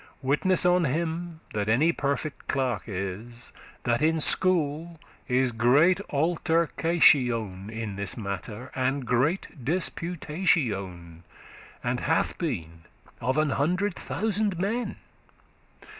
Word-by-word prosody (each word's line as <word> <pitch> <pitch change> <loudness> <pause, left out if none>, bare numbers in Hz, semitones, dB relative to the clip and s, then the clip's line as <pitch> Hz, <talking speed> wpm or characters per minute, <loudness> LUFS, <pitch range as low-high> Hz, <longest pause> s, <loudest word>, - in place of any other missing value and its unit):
Witness 165 +8 +2
on 180 -1 +4
him 165 +3 -2
that 105 0 -1
any 145 +9 +4
perfect 140 -1 -3
clerk 125 -8 -1
is, 105 +4 -6 0.3
That 120 +2 +1
in 160 +1 +3
school 165 -1 +2 0.3
is 130 0 +2
great 140 - +4
altercation 145 - +2
In 110 -3 -5
this 100 +2 -4
matter, 105 +3 -5
and 130 +1 -1
great 130 +4 0
disputation, 140 - -1 0.6
And - - -1
hath - - 0
been 85 - -4 0.4
of 130 +5 0
an 155 -2 +2
hundred 180 +9 +1
thousand 205 +6 -1
men. 220 +7 -1
140 Hz, 105 wpm, -27 LUFS, 115-170 Hz, 0.6 s, on